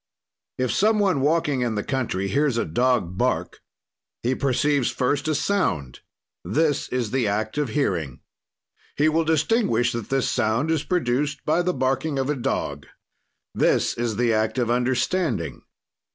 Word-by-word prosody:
"If 130 -1 0
some 215 +2 +3
one 190 -9 +2
walking 145 -2 +1
in 120 -3 -1
the 105 - -1
country 120 -8 -2
hears 140 +2 +1
a - - 0
dog 95 -1 0
bark - - -1 0.6
he 125 +2 +1
perceives 140 0 +1
first 140 +3 -1
a 155 - +1
sound: 140 - -1 0.4
this 145 - 0
is 120 -4 -2
the 130 -4 +1
act 110 +6 -1
of 145 -4 0
hearing. 85 - -1 0.8
"He 150 - +3
will 160 +1 +2
distinguish 155 - +2
that 115 -3 -5
this 135 -1 +1
sound 115 +8 0
is 160 -3 +1
produced 145 -4 -1
by 160 +3 +2
the 180 0 -1
barking 135 +3 0
of 135 +2 0
a - - -1
dog; 95 - -3 0.7
this - - +2
is 120 -2 -2
the 120 0 +2
act 110 +1 0
of 120 -2 +1
understanding. 125 - 0
130 Hz, 155 wpm, -24 LUFS, 115-150 Hz, 0.8 s, some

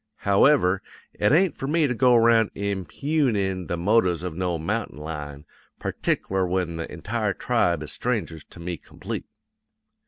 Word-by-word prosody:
However, 100 -2 +4 0.3
it 105 - +1
ain't 170 +1 +4
for 135 - -5
me 160 +1 +2
to 130 - 0
go 125 +1 +4
'round 115 -2 +5
impugnin' 100 - -1
the 85 - -2
motives 90 -2 +2
of 90 -3 -4
no 90 -1 -1
mountain 100 +3 -3
lion; 75 -2 -7 0.3
partic'lar 95 -1 -1
when 90 -2 -1
the 80 - -5
entire - - -2
tribe 85 -3 +1
is 75 - -5
strangers 105 - -2
to - - -14
me 85 0 -4
complete. - - -7
95 Hz, 150 wpm, -25 LUFS, 85-115 Hz, 0.3 s, round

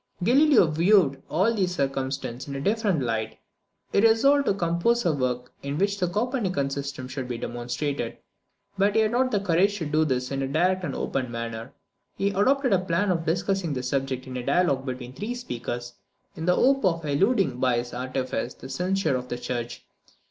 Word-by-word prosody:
Galileo 270 - +5
viewed 160 -3 +3
all 190 +9 +2
these 185 -4 0
circumstances 135 -2 -2
in 140 - -4
a - - -3
different 200 - +1
light. 110 -2 -2 0.5
He 200 - +3
resolved 275 +6 +4
to 200 - +3
compose 180 +6 +1
a 170 - +3
work 125 -2 -2
in 140 +1 -3
which 200 +3 0
the 180 - +1
Copernican 195 - -1
system 140 -2 -4
should 130 0 -5
be 120 -2 -3
demonstrated; 120 +2 -3 0.6
but 200 +1 +3
he 220 - +5
had 215 -1 +2
not 255 +2 +2
the 210 - +1
courage 200 +2 +2
to 165 - -3
do 155 +1 +2
this 130 -3 -1
in 135 0 -2
a 135 - -1
direct 180 +6 +1
and - - -3
open 130 -2 -2
manner. 115 0 -5 0.5
He 200 - +1
adopted 255 +7 +2
the 190 - +4
plan 185 +2 0
of 165 -2 -1
discussing 175 -1 0
the 125 - -3
subject 130 0 -2
in 130 -1 -6
a 125 - -4
dialogue 140 -4 +1
between 125 -1 -5
three 210 - -4
speakers, 120 - -5 0.4
in 160 +2 -5
the 180 - +4
hope 270 +1 +3
of 165 -4 +1
eluding 150 - +2
by 125 -2 +2
this 120 0 -4
artifice 130 0 -3
the 130 - -11
censure 180 +2 0
of 125 0 -4
the 120 - -3
church. 120 -1 -5
155 Hz, 190 wpm, -26 LUFS, 130-200 Hz, 0.6 s, Galileo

